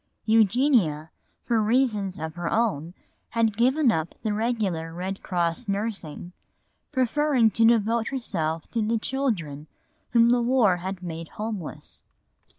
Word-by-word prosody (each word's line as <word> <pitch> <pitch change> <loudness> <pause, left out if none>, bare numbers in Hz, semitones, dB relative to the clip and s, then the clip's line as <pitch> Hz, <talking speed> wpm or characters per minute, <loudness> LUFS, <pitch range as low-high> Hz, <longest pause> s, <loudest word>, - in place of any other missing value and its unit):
Eugenia, 215 - +3 0.3
for 230 -2 +2
reasons 215 -4 +1
of 160 0 -5
her 175 0 -4
own, 185 -7 0 0.3
had 225 -2 +1
given 255 +3 +3
up 160 -3 -2
the 215 - 0
regular 205 -8 -1
Red 185 +3 -5
Cross 175 +5 -1
nursing, 195 -5 -4 0.6
preferring 260 -2 +2
to 225 +1 +3
devote 225 0 +3
herself 165 - -2
to 230 - 0
the 225 +2 +1
children 195 - -2 0.4
whom 235 -1 +4
the 245 0 +3
war 235 -7 +3
had 185 +1 -6
made 165 -1 -6
homeless. 210 -5 -6
215 Hz, 130 wpm, -25 LUFS, 175-235 Hz, 0.6 s, whom